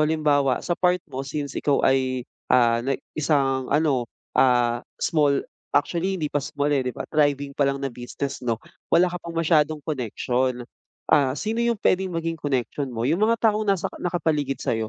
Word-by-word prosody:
halimbawa, 150 -4 +2
sa 175 - 0
part 180 +1 +2
mo 130 - -3
since 140 +1 -4
ikaw 145 -2 +1
ay, 130 -2 +1 0.2
ah, 120 -2 +4
na 135 +2 -1 0.2
isang 135 -4 +1
ano, 140 -6 +1 0.2
ah, 120 -2 +3 0.2
small, 145 -3 +1 0.3
actually 175 +6 +1
hindi 150 -4 -3
pa 145 - +1
small, 145 +2 -1
eh, 140 - +3
'di 125 - -3
ba, - - -4
thriving 145 -2 +1
pa 140 0 +1
lang 140 0 -2
na 135 - -3
business 125 +3 -5
'no, 115 -3 -1 0.3
wala 175 +1 +4
ka 180 - -5
pang 170 -1 -8
masyadong 155 -2 +2
connection. 125 -2 -1 0.5
Ah, 140 -4 +4
sino 220 +2 -2
yung 235 0 +1
puwedeng 190 -1 +1
maging 165 0 -2
connection 140 0 -2
mo? 115 -2 -3
Yung 160 +8 +1
mga 230 +2 +3
taong 215 0 -2
nasa 195 -3 +1 0.2
nakapaligid 155 -5 0
sa'yo 110 -1 -1
145 Hz, 175 wpm, -24 LUFS, 130-165 Hz, 0.5 s, ah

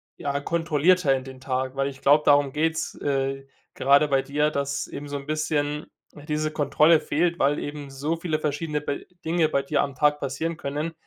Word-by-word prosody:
ja, 140 0 -2
kontrollierter 165 0 +2
in 130 -1 -2
den 130 -1 -11
Tag, 130 0 -2
weil 135 0 0
ich 135 -1 -11
glaube, 150 +2 +5
darum 145 -1 +4
geht's, 160 +1 -1
äh, 135 -1 -1 0.3
gerade 140 +3 +4
bei 135 -2 +2
dir, 145 +3 0
dass 140 -1 -2
eben 145 +1 -8
so 145 - -3
'n 140 - -9
bisschen, 150 -1 -1 0.3
äh, 145 - -13
diese 155 0 -1
Kontrolle 155 +2 +4
fehlt, 170 +3 0
weil 140 +2 +2
eben 145 -1 -6
so 140 +4 -2
viele 165 -2 -1
verschiedene 150 0 -2
be 145 -1 -4 0.2
Dinge 160 -1 +2
bei 140 - +1
dir 145 0 +1
am 140 -2 -3
Tag 150 +2 +2
passieren 150 +5 -3
können, 150 +4 -3
145 Hz, 195 wpm, -25 LUFS, 140-155 Hz, 0.3 s, glaube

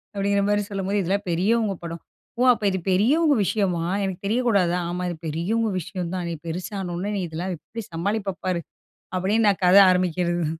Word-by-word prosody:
அப்டிங்கிறமாரி 200 +1 +1
சொல்லும்போது 200 +1 -1
இதெல்லாம் 195 +3 -1
பெரியவங்க 200 +5 +1
படம். 170 -1 -6 0.4
"ஓ! 250 - +3
அப்ப 225 - -7
இது 190 - -1
பெரியவங்க 285 - +3
விஷயமா? 180 -6 0 0.2
எனக்கு 190 -2 -3
தெரியக்கூடாதா?" 200 -6 +2
ஆமா 180 +1 -3
இது 175 - -4
பெரியவங்க 205 +8 0
விஷயம் 180 0 -5
தான். 180 -1 -3
நீ 170 - -3
பெருசானவுனே 185 +2 -4
நீ 195 - -1
இதெல்லாம் 175 +4 -4
எப்டி 230 +8 -8
சமாளிப்ப 195 +2 -2
பாரு. 180 -2 0 0.6
அப்டின்னு 210 +4 +2
நான் 195 -2 +1
கத 180 +2 +6
ஆரம்பிக்கிறது 175 -2 0
190 Hz, 160 wpm, -24 LUFS, 175-205 Hz, 0.6 s, கத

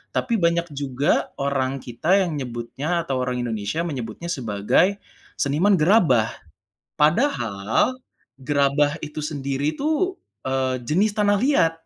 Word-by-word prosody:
Tapi 235 - 0
banyak 170 -2 +1
juga, 140 0 0
orang 135 -1 -1
kita 155 +12 +1
yang 155 - -3
nyebutnya 135 +6 -3
atau 130 -2 0
orang 125 0 -2
Indonesia 115 +6 -2
menyebutnya 130 +3 -5
sebagai, 130 - +1 0.4
seniman 165 +7 +3
gerabah. 155 - +4 0.7
Padahal, 150 - +2 0.5
gerabah 145 +2 +2
itu 150 0 -6
sendiri 140 0 -2
tuh, 315 +6 0 0.2
eee, 130 -1 -1
jenis 195 - +1
tanah 205 -1 +2
liat. 205 - +3
145 Hz, 115 wpm, -23 LUFS, 130-175 Hz, 0.7 s, gerabah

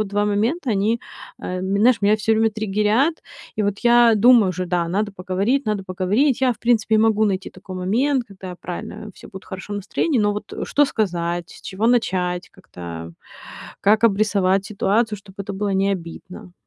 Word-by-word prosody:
два 205 +1 0
момента- 230 +9 0
они, 215 +3 +1 0.4
э, 180 0 -4
знаешь, 200 +6 +2
меня 205 +1 +4
всё 215 +1 0
время 220 0 +3
триггерят. 215 - 0 0.3
И 215 - 0
вот 205 0 -1
я 240 -1 +5
думаю 230 -1 +6
уже, 185 0 -4
да, 175 -1 -1
надо 205 +3 -1
поговорить, 195 +8 -1
надо 210 -2 -1
поговорить. 200 +10 +1
Я, 260 -1 +3
в 230 - -15
принципе, 225 -2 +2
могу 220 -1 +3
найти 195 -2 -2
такой 185 0 -10
момент, 240 +8 0
когда, 190 -2 -9
правильно, 180 +4 -7
все - - -14
будут 190 -3 -11
в - - -20
хорошем 190 +2 -6
настроении, 230 - -1
но 205 -1 +2
вот 210 - -7
что 290 - +3
сказать, 175 -6 -2
с - - -13
чего 205 +4 -2
начать, 180 -7 0
как-то 85 - -9 0.7
как 215 +3 +3
обрисовать 200 -3 +2
ситуацию, 210 +1 0
чтоб 195 -1 -17
это 200 0 -5
было 200 +1 -2
не 195 +1 +2
обидно? 180 0 -8
205 Hz, 175 wpm, -21 LUFS, 185-225 Hz, 0.7 s, думаю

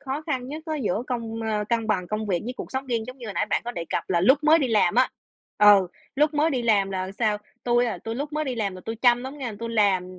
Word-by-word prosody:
khó 280 +2 -4
khăn 260 -4 -2
nhất 310 +2 -6
á 315 - -2
giữa 225 -5 -1
công 225 -2 -4
ơ 215 -1 -1
cân 230 -2 0
bằng 190 -5 0
công 215 0 -2
việc 180 -4 0
với 250 - -3
cuộc - - -7
sống 265 +1 -3
riêng 230 -3 -1
giống 255 +1 -9
như 240 - -8
hồi 205 - -6
nãy 205 - 0
bạn - - 0
có 240 - -3
đề 170 -5 -4
cập - - -2
là 170 -1 +2
lúc 265 +10 +5
mới 315 +2 +6
đi 275 -5 0
làm 215 -1 +3
á 255 +2 +4 0.5
ừ, 205 -3 +7 0.3
lúc 300 +1 +2
mới 305 +2 +2
đi 255 -4 -1
làm, 205 -4 +2
là 185 0 -3
sao? 215 -3 +1 0.3
Tui, 240 0 +3
à, 230 - -3
tui 225 - -5
lúc 285 +4 -4
mới 305 0 -1
đi 260 -3 -2
làm 205 -5 -2
là - - -10
tui 225 - -4
chăm 240 +1 +3
lắm 280 +3 -7
nghe, 245 -5 -4
tui 230 - -3
làm, 185 -4 +1
230 Hz, 295 wpm, -25 LUFS, 210-265 Hz, 0.5 s, ừ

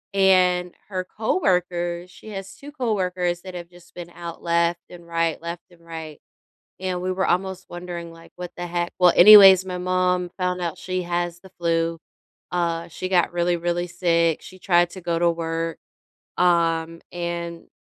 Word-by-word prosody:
And, 180 -2 +3
her 185 -2 -2
coworkers 180 -4 -1
she 220 - -13
has 195 -1 -7
2 290 +1 -11
coworkers 185 - -1
that 185 0 -9
have 175 -1 -7
just 175 0 -19
been 175 -1 -8
out, 170 -1 -8
left 170 0 +1
and 175 -1 -12
right, 165 -1 0
left 170 +1 -6
and 170 -1 -21
right. 160 -2 -8 0.6
And, 185 -1 -2
we 185 0 -1
were 190 +1 0
almost 190 +1 -1
wondering 175 -1 -7
like, 165 0 -16
"What 180 -1 -7
the 175 - -4
heck?" 175 0 -2
Well, 180 -2 +6
anyways, 195 -1 +10
my 180 -1 -4
mom 180 0 0
found 180 -1 -1
out 170 -3 -3
she 185 0 -3
has 175 0 -2
the 190 - -16
flu. 165 -1 0 0.5
Uh, 170 -1 -1
she 185 +2 -5
got 180 -2 +2
really, 175 0 +1
really 175 +1 -1
sick. 170 -2 +1
She 185 - -12
tried 175 -2 +3
to 190 - -9
go 170 -1 -1
to 170 0 +4
work, 165 -1 -3 0.6
um, 165 -2 +1
and 170 -1 -5
175 Hz, 170 wpm, -23 LUFS, 170-185 Hz, 0.6 s, anyways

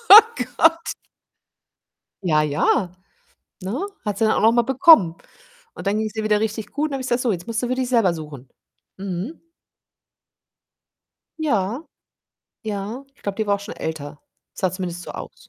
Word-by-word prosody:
Oh 450 - +7 0.2
Gott. 330 +1 +4 1.3
Ja, 155 -4 +3
ja, 170 +5 +1 0.7
ne? 250 - -2 0.2
Hat 205 -1 -2
sie 225 - +2
dann 220 - +3
auch - - +1
noch 225 +2 +5
mal 240 0 +4
bekommen, 250 - +6 0.6
und - - -8
dann 205 +2 +1
ging's 215 -1 -3
ihr 220 - -2
wieder 210 -1 +2
richtig 220 -1 -3
gut 295 +1 -1
und 305 - -3
dann - - -1
habe 265 - -3
ich - - -5
gesagt: 245 +1 +1
„So, 240 - +1
jetzt 180 0 -4
musst 230 0 -2
du 245 - -1
für 255 - 0
dich 255 -1 -1
selber 225 -8 +3
suchen.“ 145 -5 -9 0.5
Mhm. 195 - -5 2.0
Ja, 240 - 0 0.8
ja, 215 +5 -4
ich - - -28
glaube, 200 -1 -3
die 220 -1 -1
war 200 - +3
auch 200 - -4
schon 200 - -8
älter, 150 -2 -5 0.3
sah 185 - 0
zumindest 180 -2 -5
so - - -8
aus. - - -10
215 Hz, 180 wpm, -22 LUFS, 185-250 Hz, 2.0 s, Oh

